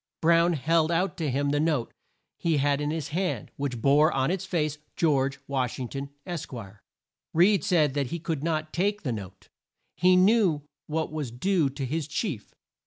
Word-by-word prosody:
Brown 170 Hz, +1 st, +4 dB
held 160 Hz, +3 st, +2 dB
out 170 Hz, +1 st, +1 dB
to 155 Hz, -4 st, -1 dB
him 140 Hz, +2 st, 0 dB
the 145 Hz, -, +1 dB
note 150 Hz, -6 st, 0 dB, 0.5 s
he 165 Hz, -3 st, +1 dB
had 145 Hz, 0 st, +1 dB
in 145 Hz, -, -1 dB
his 155 Hz, -2 st, -3 dB
hand, 180 Hz, +4 st, -2 dB
which 140 Hz, -4 st, -3 dB
bore 150 Hz, +4 st, +5 dB
on 135 Hz, +4 st, +1 dB
its 190 Hz, 0 st, -2 dB
face: 155 Hz, -5 st, -1 dB, 0.2 s
George 140 Hz, -4 st, +1 dB
Wash 130 Hz, -3 st, -1 dB
ing 125 Hz, -2 st, -4 dB
ton, 140 Hz, 0 st, -5 dB, 0.2 s
Esq. 170 Hz, -3 st, -5 dB, 0.9 s
Reed 190 Hz, +4 st, +5 dB
said 165 Hz, -8 st, +3 dB
that 140 Hz, -2 st, 0 dB
he 170 Hz, -, -3 dB
could 160 Hz, -3 st, -3 dB
not 155 Hz, -1 st, -1 dB
take 205 Hz, +4 st, 0 dB
the 130 Hz, -, -1 dB
note. 95 Hz, -3 st, -9 dB, 0.5 s
He 185 Hz, 0 st, +4 dB
knew 185 Hz, -5 st, +4 dB, 0.2 s
what 160 Hz, 0 st, -2 dB
was 150 Hz, -5 st, -3 dB
due 160 Hz, +5 st, +1 dB
to 135 Hz, 0 st, -5 dB
his 150 Hz, +3 st, -2 dB
chief. 150 Hz, -, -4 dB
155 Hz, 180 wpm, -27 LUFS, 140-170 Hz, 0.9 s, bore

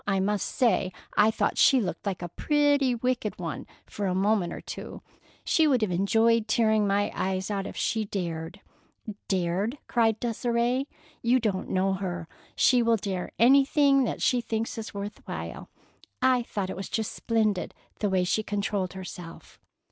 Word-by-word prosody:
I 195 Hz, -1 st, +1 dB
must 200 Hz, +1 st, 0 dB
say, 235 Hz, -7 st, +1 dB, 0.2 s
I 210 Hz, +1 st, +5 dB
thought 210 Hz, -2 st, 0 dB
she 265 Hz, -, +6 dB
looked 185 Hz, -2 st, -4 dB
like 185 Hz, -3 st, -3 dB
a 175 Hz, -, -4 dB
pretty 285 Hz, -, +2 dB
wicked 240 Hz, -2 st, -1 dB
one 165 Hz, -3 st, -5 dB, 0.2 s
for 205 Hz, -2 st, -4 dB
a 180 Hz, -, 0 dB
minute 195 Hz, -2 st, +1 dB
or -, -, -6 dB
two. -, -, -8 dB, 0.4 s
She 320 Hz, -1 st, +3 dB
would 255 Hz, -6 st, +2 dB
have 205 Hz, -, 0 dB
enjoyed 225 Hz, +5 st, +2 dB
tearing 220 Hz, -2 st, +2 dB
my 200 Hz, +1 st, +1 dB
eyes 190 Hz, +1 st, -2 dB
out 195 Hz, -1 st, -2 dB
if -, -, -8 dB
she 225 Hz, -, 0 dB
had 215 Hz, -2 st, -3 dB
dared." 170 Hz, -1 st, -4 dB, 0.7 s
"Dared!" 190 Hz, +7 st, 0 dB
cried 225 Hz, -2 st, +2 dB
Desire. 240 Hz, +2 st, 0 dB, 0.4 s
"You 245 Hz, +2 st, +3 dB
don't 205 Hz, -5 st, -2 dB
know 190 Hz, +1 st, +1 dB
her. 180 Hz, -3 st, -4 dB, 0.3 s
She 250 Hz, -2 st, +4 dB
will 230 Hz, -1 st, +3 dB
dare 190 Hz, -3 st, -4 dB
anything 275 Hz, +2 st, +5 dB
that -, -, -3 dB
she 250 Hz, -1 st, +3 dB
thinks 225 Hz, -1 st, -3 dB
is 220 Hz, -, -6 dB
worth 205 Hz, +1 st, -6 dB
while. -, -, -6 dB, 0.5 s
I 255 Hz, -1 st, +3 dB
thought 200 Hz, -5 st, -4 dB
it -, -, -5 dB
was 195 Hz, +2 st, -6 dB
just 220 Hz, -2 st, -2 dB
splendid, 215 Hz, -4 st, -1 dB, 0.2 s
the 205 Hz, -, 0 dB
way 190 Hz, -1 st, +2 dB
she 180 Hz, +4 st, +1 dB
controlled 200 Hz, -3 st, -2 dB
herself." 180 Hz, -3 st, -10 dB
210 Hz, 170 wpm, -27 LUFS, 190-235 Hz, 0.7 s, she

